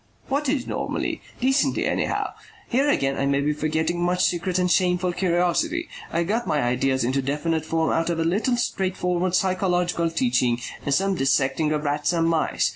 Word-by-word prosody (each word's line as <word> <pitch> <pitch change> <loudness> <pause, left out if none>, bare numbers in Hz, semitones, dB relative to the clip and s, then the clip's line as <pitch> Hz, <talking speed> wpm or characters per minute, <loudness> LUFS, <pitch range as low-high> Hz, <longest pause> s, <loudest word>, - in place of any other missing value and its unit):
"What 280 +1 0
is 260 -2 0
normally? - - -3 0.2
Decently, 265 +3 +2
anyhow. - - -1 0.4
Here 270 +4 +2
again 135 - +1
I 140 - +1
may 140 0 +2
be 150 +2 +1
forgetting 160 +3 -1
much 180 +1 +2
secret 180 +1 0
and 180 -1 +1
shameful 180 -1 +2
curiosity. 185 - 0 0.2
I 170 +1 +1
got 215 +5 -1
my 155 -3 +1
ideas 130 +1 +1
into 130 +3 0
definite 150 +4 -1
form 160 0 0
out 165 +1 0
of 170 - -1
a - - +2
little 215 +9 +1
straightforward 185 -4 -1
physiological 180 -3 +1
teaching 125 -5 +1 0.2
and 140 - -2
some 195 +3 +1
dissecting 135 0 +1
of 150 -1 -1
rats 145 +3 0
and 165 -1 +2
mice. 165 -1 +1
170 Hz, 175 wpm, -24 LUFS, 150-185 Hz, 0.4 s, Decently